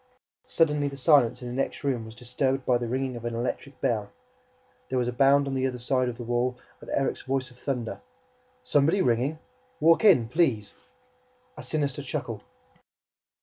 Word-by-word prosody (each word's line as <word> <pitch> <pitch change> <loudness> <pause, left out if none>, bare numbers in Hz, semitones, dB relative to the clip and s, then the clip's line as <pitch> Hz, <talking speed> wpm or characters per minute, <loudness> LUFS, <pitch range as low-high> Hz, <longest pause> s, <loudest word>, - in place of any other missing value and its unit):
Suddenly, 150 -3 +2
the 140 -1 -6
silence 135 -4 +3
in - - -5
the 120 - -5
next 135 +3 -2
room 130 -5 -1
was 110 0 -11
disturbed 130 +2 -1
by 125 -1 +3
the 120 - -3
ringing 130 +1 -2
of 120 - -8
an 120 -1 -3
electric 125 +3 -4
bell. 105 -4 0 0.8
There 130 - -1
was 125 -1 +1
a 125 - -2
bound 140 +2 +4
on 135 - -3
the 130 0 +1
other 125 -1 -4
side 125 +1 0
of 120 - -7
the 120 - -6
wall 120 +1 -1 0.2
and - - -12
Erik's 135 - -1
voice 130 -1 -2
of 125 - -19
thunder: 120 - -3 0.6
"Somebody 160 +7 +3
ringing! 125 +6 +1 0.4
Walk 165 +6 +5
in, 155 - +6
please!" 115 -8 +1 0.8
A - - -9
sinister 145 -2 -2
chuckle. 140 - -4
130 Hz, 180 wpm, -27 LUFS, 120-140 Hz, 0.8 s, in